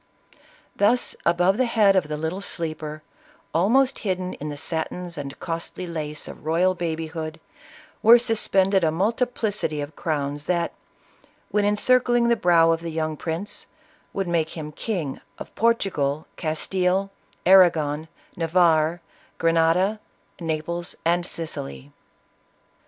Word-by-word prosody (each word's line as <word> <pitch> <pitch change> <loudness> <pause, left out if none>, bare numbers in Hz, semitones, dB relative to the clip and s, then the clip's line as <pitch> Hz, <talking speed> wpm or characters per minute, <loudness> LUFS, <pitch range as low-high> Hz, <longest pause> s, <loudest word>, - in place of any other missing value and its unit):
Thus 225 +5 +2
above 175 +3 +3
the 255 - +3
head 210 -4 +4
of 185 -5 +2
the 150 0 -3
little 160 +5 -3
sleeper, 155 -4 -4 0.5
almost 250 - +3
hid 190 -4 -1
den 185 0 -5
in 150 - -4
the 145 - -6
satins 165 +3 -3
and 140 -1 -7
costly 165 +2 -4
lace 155 -3 -4
of - - -10
royal 170 +4 +2
babyhood, 160 -2 -4 0.6
were 230 +2 +8
suspended 195 -5 +2
a 160 - +4
multiplicity 210 -2 -1
of 145 +2 -6
crowns 145 -2 -2
that, 170 -2 0 0.8
when 210 -1 +2
encircling 240 +3 +3
the 235 - +4
brow 170 -5 +4
of 165 0 0
the 170 - -4
young 155 -1 -2
prince, 165 +6 -5 0.4
would 195 -2 -2
make 170 -1 -1
him 150 -1 -6
King 160 - -4 0.2
of - - -9
Portugal, 170 -11 0
Castile, 180 +4 0 0.3
Arragon, 160 -5 +5 0.3
Navarre, 165 -1 +2 0.4
Gre 165 0 +2
nada, 170 +6 +2 0.4
Naples 170 +1 -2
and 175 +1 +2
Sicily. 70 - -6
170 Hz, 130 wpm, -24 LUFS, 155-195 Hz, 0.8 s, were